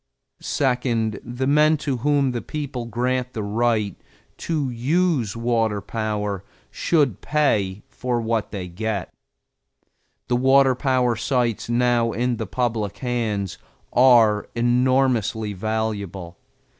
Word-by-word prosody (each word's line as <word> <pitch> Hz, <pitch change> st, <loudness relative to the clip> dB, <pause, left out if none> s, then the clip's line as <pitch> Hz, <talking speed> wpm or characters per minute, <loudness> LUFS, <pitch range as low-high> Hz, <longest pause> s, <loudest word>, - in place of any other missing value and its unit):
Second, 125 Hz, -5 st, 0 dB
the 120 Hz, +2 st, -3 dB
men 150 Hz, +3 st, +4 dB
to 140 Hz, -3 st, -2 dB
whom 140 Hz, +1 st, +2 dB
the 120 Hz, -1 st, -3 dB
people 140 Hz, -5 st, -5 dB
grant 125 Hz, +2 st, -1 dB
the 110 Hz, -, -3 dB
right 105 Hz, -1 st, 0 dB, 0.4 s
to 150 Hz, -6 st, -2 dB
use 130 Hz, -, 0 dB
water 115 Hz, -3 st, +1 dB
power 105 Hz, -2 st, -3 dB, 0.3 s
should 145 Hz, -, +1 dB
pay 105 Hz, -10 st, 0 dB
for 125 Hz, -2 st, -2 dB
what 115 Hz, -1 st, -1 dB
they 95 Hz, -3 st, -5 dB
get. 100 Hz, +1 st, -4 dB, 1.1 s
The 120 Hz, -, +1 dB
water 135 Hz, +1 st, +5 dB
power 125 Hz, -2 st, +1 dB
sites 120 Hz, -1 st, -1 dB
now 120 Hz, -1 st, +2 dB
in 120 Hz, 0 st, 0 dB
the 110 Hz, -, -4 dB
public 115 Hz, -2 st, -2 dB
hands 110 Hz, -6 st, -2 dB, 0.3 s
are 120 Hz, -5 st, +5 dB
enormously 120 Hz, -3 st, +1 dB
valuable. 100 Hz, -4 st, -3 dB
120 Hz, 115 wpm, -23 LUFS, 110-130 Hz, 1.1 s, water